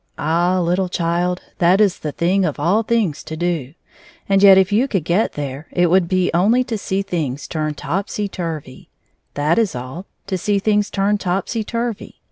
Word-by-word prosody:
Ah! 175 +4 +1
little 180 +2 0
child, 175 +1 -1 0.2
that 180 +3 +4
is 205 -4 +3
the 150 - -4
thing 185 +6 +1
of 155 -5 -2
all 180 +9 +2
things 215 -9 0
to 160 - -7
do. 165 -5 -2 0.5
And 195 -1 +3
yet 195 -1 +8
if 190 +1 +3
you 230 +6 +3
could 195 - -1
get 175 +7 +1
there, 145 +1 -5
it 175 -1 +2
would 185 -1 +3 0.2
only 210 +9 +3
be 255 - -5
to 225 - -1
see 195 0 -2
things 155 -8 -3
turned 155 -2 -3
topsyturvy. 165 -3 -4 0.5
That 150 +7 +2
is 220 - 0
all 130 +10 -7
— - - -50
to 190 -2 -3
see 205 +3 +1
things 210 0 +1
turned 200 +1 0
topsyturvy. 220 +4 -3
180 Hz, 180 wpm, -19 LUFS, 165-200 Hz, 0.5 s, yet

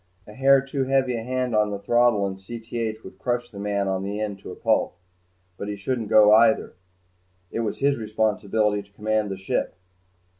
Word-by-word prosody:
A 105 - -12
hair 135 +3 +5
too 135 0 -2
heavy 130 -2 +1
a 115 - -3
hand 125 +1 -2
on 105 0 +3
the 100 - -3
throttle 120 0 +2
in 95 -1 -4
Cth 110 +2 -5
would 95 0 -12
crush 120 +1 -2
the 100 - -9
man 100 -1 -1
on 95 -1 -1
the 100 +2 -4
end 105 -2 -3
to - - -10
a - - -8
pulp. - - 0 0.6
But 100 - -5
he 105 - -3
shouldn't 110 +2 -3
go 105 -1 +7
either. 110 0 +4 0.8
It - - -3
was 110 -3 -2
his 140 -2 +2
responsibility 105 -1 0
to 100 0 -21
command 110 0 -1
the 95 - -4
ship. 95 - -2
110 Hz, 195 wpm, -24 LUFS, 100-120 Hz, 0.8 s, go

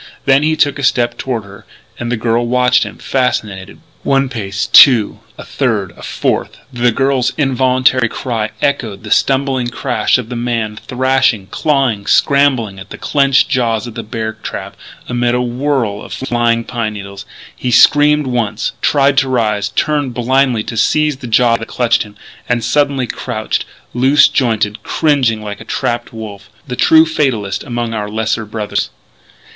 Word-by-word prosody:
Then 135 0 +4
he 155 +1 +1
took 145 -2 +1
a - - -4
step 120 -2 +1
toward 120 -5 -3
her. 100 0 -14 0.4
And 120 0 -3
the 125 - 0
girl 115 +1 0
watched 125 +1 +3
him, - - -9
fascinated. 105 -7 -2 0.2
One 135 -1 +1
pace, 100 -5 -3
two, 120 -6 +6 0.2
a - - -8
third, - - -1
a - - -15
fourth - - -2 0.2
the 120 0 +2
girl's 135 +1 0
involuntary 130 -3 +2
cry 115 -4 -3
echoed 110 -8 -1
the 105 - -8
stumbling 135 -2 +1
crash 125 +2 0
of 120 -3 -6
the 125 - -5
man 115 -3 -2
thrashing, 130 -6 0
clawing, 135 -9 0
scrambling 130 -8 +2
in 95 - -10
the - - -8
clenched 140 -1 +2
jaws 115 -3 0
of 120 - -8
the - - -5
bear 110 0 -4
trap 110 - -7 0.3
amid 120 0 0
a 125 - +1
whirl 120 -4 -1
of - - -9
flying 120 -2 0
pine 115 -2 -3
needles. 100 -1 -8 0.3
He 125 - -3
screamed 145 +4 +5
once, 115 -4 -2
tried 140 -1 +3
to 135 -1 -1
rise, 105 -5 0
turned 145 +1 -1
blindly 125 -1 +1
to 115 - -6
seize 150 +5 +2
the 130 - -8
jaws 115 0 +3
that 115 - -7
clutched 115 -2 +1
him; 105 -1 -7 0.3
and 120 -2 0
suddenly 140 +1 +1
crouched, 110 -2 -3 0.3
loose 135 +4 +5
jointed, 110 -4 0
cringing 125 -6 0
like 105 -1 -7
a - - -7
trapped 120 0 -3
wolf 105 -3 -9 0.2
the 125 - -4
true 160 +5 +5
fatalist 130 -11 -1
among 120 -3 -3
our 105 -2 -3
lesser 110 +1 -2
brothers. 105 -1 -3
120 Hz, 165 wpm, -15 LUFS, 110-135 Hz, 0.4 s, two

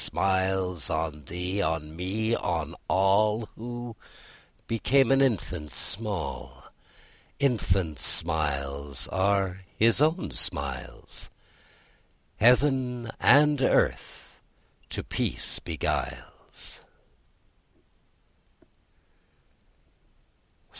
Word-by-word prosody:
Smiles 95 -4 0
on 80 -2 -3
thee, 90 +5 -3
on 80 -3 -2
me, 105 +6 -1
on 80 -4 -2
all, 105 +4 +3
Who 120 0 -7 0.7
became 130 +3 +2
an 135 0 +4
infant 95 - -1
small; 100 +4 -3 0.7
Infant 95 - 0
smiles 70 -4 0
are 95 -1 0 0.2
His 115 +4 +4
own 160 - +1
smiles; 70 +1 -4 1.1
Heaven 125 -1 +3
and 150 -1 +5
earth - - 0 0.5
to - - -4
peace - - -2
beguiles. - - -5
95 Hz, 70 wpm, -27 LUFS, 80-115 Hz, 1.1 s, and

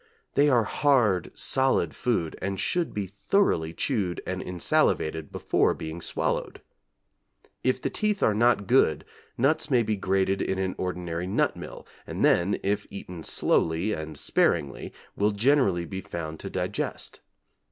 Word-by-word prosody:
They 145 +1 +4
are 120 -4 +4
hard, 115 - +2
solid 135 0 +1
food, 110 -11 -1
and 95 0 -2
should 175 -2 0
be 100 -1 -3
thoroughly 100 - +1
chewed 95 - -1
and 95 0 -3
insalivated 80 -3 0
before - - +1
being 80 +2 -6
swallowed. - - -2 1.0
If 130 0 +1
the - - -3
teeth 210 -2 0
are 110 - +4
not 115 -1 +3
good, 120 -7 +3 0.3
nuts 155 +5 +2
may 125 -4 +4
be 110 -1 0
grated 95 0 0
in 95 - -1
an 95 -1 -1
ordinary 90 -1 -3
nut 95 - +1
mill, - - -9 0.2
and - - 0
then, 90 +4 +3
if 100 +1 -1
eaten 90 -3 -8
slowly 85 +8 +1
and 80 -3 -6
sparingly, 70 -1 0 0.2
will 105 +1 +2
generally 100 -6 +2
be 95 +2 -6
found 80 -3 -6
to - - -6
digest. - - -4
95 Hz, 145 wpm, -26 LUFS, 85-120 Hz, 1.0 s, They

